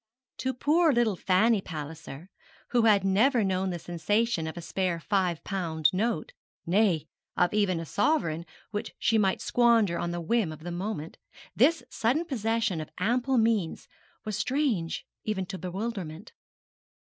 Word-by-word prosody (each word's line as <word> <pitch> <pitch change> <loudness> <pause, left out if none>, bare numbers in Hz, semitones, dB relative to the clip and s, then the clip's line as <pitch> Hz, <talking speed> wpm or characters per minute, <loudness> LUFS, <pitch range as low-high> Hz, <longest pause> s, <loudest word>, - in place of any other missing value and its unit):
To 260 - -1
poor 315 +5 +3
little 235 -5 +2
Fanny 195 +4 +3
Palliser, 160 0 -8 0.4
who 240 -2 +3
had 210 -3 +5
never 225 +5 +3
known 190 -1 0
the 175 - -3
sensation 175 +2 0
of 160 - -6
a - - -3
spare 175 0 -1
five 180 -3 0
pound 160 -6 0
note, 210 -3 -1 0.3
nay, 180 -3 +2 0.3
of 180 +1 +2
even 200 -5 +2
a 165 - -5
sovereign 170 - 0 0.2
which 210 -1 -4
she 225 - +2
might 190 -2 +1
squander 230 -7 +3
on 170 - -2
the 175 0 -3
whim 185 +1 0
of 155 0 -10
the 175 - -5
moment, 175 -3 -4 0.4
this 285 +4 +4
sudden 260 +9 +1
possession 225 - -1
of 155 - -8
ample 245 +7 +1
means 220 -7 +1 0.4
was 215 -1 -2
strange 235 - -1 0.2
even 200 -3 -2
to 190 0 -7
bewilderment. 190 -1 -5
195 Hz, 150 wpm, -28 LUFS, 170-230 Hz, 0.4 s, had